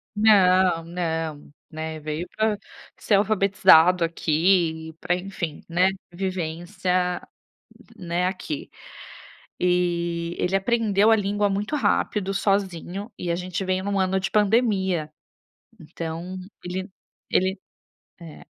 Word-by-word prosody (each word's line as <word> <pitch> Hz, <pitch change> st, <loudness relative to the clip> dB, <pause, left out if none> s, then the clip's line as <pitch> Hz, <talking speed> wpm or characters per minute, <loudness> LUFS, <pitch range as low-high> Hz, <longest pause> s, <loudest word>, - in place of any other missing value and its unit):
Não, 185 Hz, -5 st, +4 dB
não, 165 Hz, -4 st, -4 dB, 0.2 s
né, 160 Hz, 0 st, -5 dB
veio 155 Hz, +3 st, -4 dB
para 215 Hz, -1 st, +1 dB, 0.4 s
ser 210 Hz, -, +2 dB
alfabetizado 195 Hz, -4 st, +5 dB
aqui, 165 Hz, 0 st, +1 dB
para 175 Hz, -, 0 dB
enfim, 180 Hz, -4 st, -5 dB
né, 180 Hz, +3 st, +3 dB, 0.2 s
vivência, 180 Hz, 0 st, -2 dB, 0.8 s
né, 180 Hz, -1 st, -1 dB
aqui. 175 Hz, -5 st, -5 dB, 0.9 s
E, 175 Hz, -1 st, 0 dB
ele 185 Hz, +2 st, +1 dB
aprendeu 215 Hz, 0 st, +3 dB
a -, -, +7 dB
língua 205 Hz, 0 st, 0 dB
muito 205 Hz, +8 st, -2 dB
rápido, 205 Hz, -5 st, 0 dB
sozinho, 195 Hz, +1 st, -1 dB
e 175 Hz, -, -4 dB
a 170 Hz, -, +1 dB
gente 180 Hz, +1 st, -4 dB
veio 185 Hz, 0 st, 0 dB
em -, -, -5 dB
um 200 Hz, -1 st, 0 dB
ano 190 Hz, 0 st, +1 dB
de 190 Hz, -, -3 dB
pandemia. 200 Hz, -7 st, +2 dB, 0.7 s
Então 165 Hz, +3 st, -6 dB, 0.3 s
ele 185 Hz, +2 st, -4 dB, 0.4 s
ele, 190 Hz, +1 st, +1 dB, 0.6 s
é, 165 Hz, -3 st, -11 dB
180 Hz, 115 wpm, -24 LUFS, 170-195 Hz, 0.9 s, a